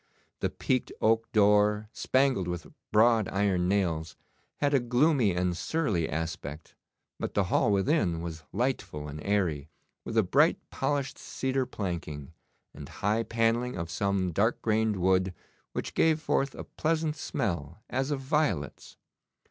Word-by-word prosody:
The - - 0
peaked 130 -1 -1
oak 115 +1 +2
door, 105 0 +4
spangled 130 -8 +1
with 90 -2 -4 0.3
broad 110 -1 +4
iron 95 -3 +1
nails, 85 -5 0 0.4
had 145 0 0
a 140 - +5
gloomy 120 - +2
and 90 0 0
surly 105 - -1
aspect, 80 -1 -5 0.5
but - - -4
the 100 - +3
hall 115 -6 +3
within 95 - +1
was 80 -2 -6
lightful 105 - -2
and 75 +1 -7
airy, 85 -8 0 0.3
with - - -4
a - - +6
bright - - +4
polished 140 0 -1
cedar 130 -1 -2
planking, 85 - -5 0.4
and - - -9
high 105 +3 0
panelling 115 +1 0
of 85 -1 -4
some 95 -1 0
dark 105 +8 +1
grained 110 -1 +2
wood 95 0 +2 0.4
which - - -4
gave 160 -1 +3
forth 140 -3 0
a - - -6
pleasant 160 -1 -1
smell 85 - -3
as 130 +1 -1
of 145 -2 -1
violets. 130 - -1
105 Hz, 140 wpm, -29 LUFS, 90-130 Hz, 0.5 s, a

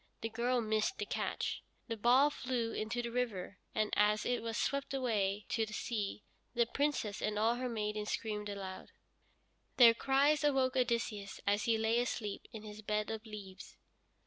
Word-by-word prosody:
The 225 - -2
girl 240 +2 +1
missed 220 - 0
the - - -2
catch. - - -2 0.3
The 230 - -2
ball 250 +7 +5
flew 245 -5 -2
into 225 +3 -2
the 235 - -3
river, 215 -6 -2 0.2
and, 215 -1 +1
as 210 +1 +3
it 245 0 0
was 230 0 -3
swept 280 0 -1
away 210 -6 0
to 225 - +1
the 215 -1 -5
sea, 210 -3 -3 0.3
the 235 0 +4
Princess 255 -6 -1
and 210 0 -1
all 225 +2 +3
her 250 +1 -2
maidens 210 -2 -2
screamed 210 -2 -3
aloud. 195 -2 -6 0.9
Their 235 -2 +9
cries 280 +5 +3
awoke 265 -3 +3
Odysseus, 230 -5 -1
as 205 +3 +2
he 230 -2 +3
lay 220 +2 +2
asleep 220 -4 -3
in 220 -1 -8
his 210 0 -8
bed 210 0 -1
of 220 +1 -5
leaves. 195 -3 -9
225 Hz, 170 wpm, -34 LUFS, 210-245 Hz, 0.9 s, Their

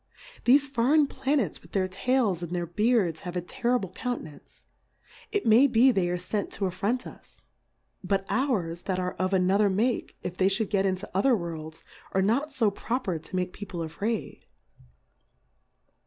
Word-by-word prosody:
Thefe 270 +4 +7
foreign 285 +2 +3
Planets 270 - -1
with 165 - -19
their 190 -2 +1
Tails 195 -1 0
and 175 +1 -4
their 175 -1 -1
Beards 190 -2 +1
have 180 -2 -7
a - - +1
terrible 235 +1 -1
Counte 245 +5 -3
nance, 150 -2 -15 0.7
it 410 -1 -1
may 230 +5 +6
be 250 +1 +5
they 190 -6 +1
are 180 - 0
fent 200 +3 -3
to 200 - -2
affront 200 +7 -1
us; - - -14 0.6
but 195 +1 0
ours 190 -11 0
that 185 - +1
are 180 0 -2
of 185 0 0
another 195 +2 +3
Make, 220 +6 -1
if 180 0 -5
they 190 0 +3
fliould 200 +1 0
get 195 -2 +2
into 190 +2 -2
other 235 +6 +3
Worlds, 160 -3 -7 0.3
are 190 - +2
not 270 +10 +1
fo 230 -7 +2
proper 200 -5 -2
to 160 +4 -9
make 180 0 -1
People 185 -5 -6
a 160 - -5
iraid. 210 +7 -3
195 Hz, 170 wpm, -27 LUFS, 180-245 Hz, 0.7 s, Thefe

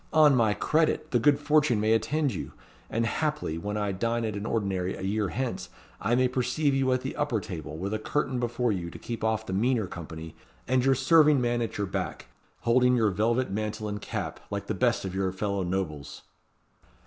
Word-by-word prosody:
On 155 -2 +7
my 110 -4 +3
credit! 155 - +1
the 120 - +3
like - - -6
good 145 -1 +5
fortune 150 -5 +3
may 110 +1 +3
attend 145 +4 +1
you; 90 - -6 0.4
and 115 +1 0
haply, 150 - -1
when 105 +4 -3
I 105 -1 0
dine 115 +4 -1
at 110 -2 -3
an 100 +2 -4
ordinary 95 -5 -1
a - - -8
year 100 +1 0
hence, 130 -2 -3 0.3
I 120 - +2
may 130 +1 +4
perceive 130 +4 0
you 135 -1 +2
at 130 0 +1
the 130 - -4
upper 145 -7 0
table, 80 -6 -7
with 100 +5 -3
a 110 - -1
curtain 125 +3 -1
before 120 0 0
you 90 -4 -3
to - - -10
keep 115 -2 -6
off 110 0 0
the 95 - -4
meaner 115 +2 +2
company, 80 -2 -8 0.3
and 130 -1 +2
your 135 0 +4
serving 150 +2 +5
man 120 -1 0
at 115 - -3
your 100 - 0
back, 95 - -4 0.3
holding 125 +1 +4
your 110 -4 +3
velvet 115 +4 +1
mantle 105 +1 -3
and 105 -1 -4
cap, - - -4
like - - -3
the - - -2
best - - +1
of 95 - -4
your 95 -1 0
fellow 100 +1 -2
nobles." 90 -6 -3
115 Hz, 210 wpm, -28 LUFS, 100-130 Hz, 0.4 s, On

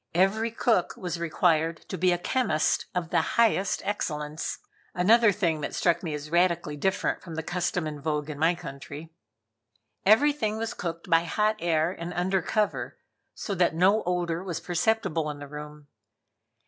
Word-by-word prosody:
Every 205 +5 +2
cook 225 -5 +1
was 175 -2 -4
required 165 -1 +1
to - - -3
be 185 +1 +2
a 175 - +2
chemist 175 -4 0
of 170 -2 -2
the - - +3
highest 220 -4 +1
excellence; 150 -6 -3 0.4
another 215 +5 +5
thing 170 -6 0
that - - -4
struck 170 -2 +2
me 160 -4 -3
as 150 +1 -8
radically 170 -3 +2
different 190 +6 -1
from 170 -3 -8
the 160 - -3
custom 180 0 -1
in 150 -2 -5
vogue 150 -1 -1
in 150 -2 -6
my 165 +3 +3
country. 150 0 -9 0.9
Everything 220 0 +3
was 225 0 -3
cooked 170 +1 -5
by 165 -1 +3
hot 215 +5 +1
air 165 -2 +1
and 175 0 -6
under 185 +1 +1
cover, 210 +5 -1 0.4
so 205 - -4
that 175 -3 +2
no 195 +6 +4
odor 175 -1 -1
was 175 -4 -4
perceptible 175 -3 0
in 150 - -5
the 145 0 -8
room. 150 0 -9
175 Hz, 165 wpm, -27 LUFS, 155-195 Hz, 0.9 s, another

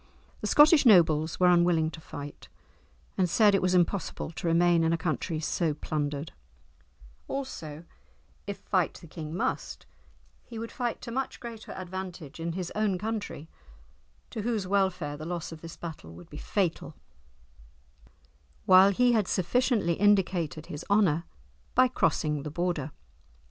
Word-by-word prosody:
The - - -3
Scottish 300 +1 +6
nobles 165 - +4
were 180 - +4
unwilling 175 -2 +3
to 160 - -10
fight, 145 -2 -9 0.7
and 180 -2 +3
said 210 +3 +5
it 195 - +3
was 185 0 +2
impossible 175 -2 0
to 170 - -5
remain 170 0 +4
in 165 - +2
a - - +1
country 160 0 -2
so 160 0 -1
plundered; 145 0 -3 1.0
also, 165 - -6 0.6
if 200 - -4
fight 185 -4 0
the - - -12
king 155 0 -7
must, - - -3 0.6
he 230 - -10
would 230 +1 -5
fight 245 -2 -3
to 235 - -7
much 265 +3 -3
greater 230 -2 -9
advantage 185 -5 -7
in 165 0 -3
his 180 -1 -4
own 210 -3 0
country, 210 -6 -4 0.8
to 225 - -4
whose 220 -3 -1
welfare 185 -6 0
the 155 - -8
loss 170 -1 -4
of 160 -1 -10
this 165 0 -9
battle 160 - -8
would 85 +1 -14
be 150 - -9
fatal; 185 0 -2 1.7
while 190 +1 +7
he 245 +5 +3
had 215 -5 +2
sufficiently 215 -1 +1
indicated 180 -6 +1
his 145 +1 -7
honour 180 -6 +3 0.5
by 255 +1 +6
crossing 155 - 0
the 150 - -5
Border. 170 -2 -2
175 Hz, 150 wpm, -28 LUFS, 160-205 Hz, 1.7 s, while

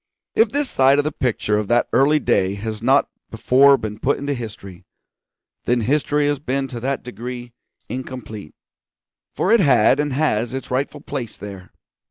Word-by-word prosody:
If 225 0 +3
this 285 +4 -1
side 135 - +3
of 145 - +2
the 155 - -2
picture 105 -6 -1
of 105 - -3
that 120 +2 +2
early 145 +3 +4
day 100 -8 +1
has 110 +1 -5
not 130 +4 +3 0.2
before 135 +5 +4
been 105 -2 -6
put 140 - +1
into 140 +1 -3
history, 105 -7 -8 0.8
then 120 -1 +1
history 145 +4 +1
has 145 -1 0
been 135 0 -2
to 120 - -6
that 135 +3 -2
degree 120 +1 -7 0.3
incomplete, 120 -8 -7 0.8
for 190 - 0
it 230 - +6
had 135 - +4
and 150 -1 0
has 130 -4 0
its 135 - -6
rightful 130 +3 -2
place 125 -6 -6
there. 100 -2 -10
125 Hz, 170 wpm, -21 LUFS, 110-140 Hz, 0.8 s, it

